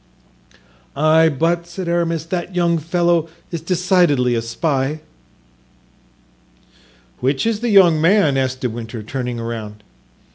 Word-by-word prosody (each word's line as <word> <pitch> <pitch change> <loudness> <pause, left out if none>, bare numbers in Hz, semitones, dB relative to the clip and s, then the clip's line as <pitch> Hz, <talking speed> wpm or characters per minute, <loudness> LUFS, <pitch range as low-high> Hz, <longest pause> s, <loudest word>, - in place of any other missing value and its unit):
"Ay, 155 +2 +4
but," 165 +4 -1
said 175 +1 -6
Aramis, 170 -2 -1
"that 180 +2 -4
young 170 -2 +1
fellow 170 0 0 0.2
is 170 -2 -4
decidedly 175 -7 +2
a 115 - 0
spy." 135 +4 -2 2.2
"Which 135 - 0
is 225 -2 0
the 240 +1 -2
young 180 -7 +5
man?" 165 -4 +3
asked 130 -1 -1
De 125 - -1
Winter, 115 -1 -7
turning 125 +1 -4
around. 110 -2 -6
160 Hz, 120 wpm, -19 LUFS, 130-175 Hz, 2.2 s, young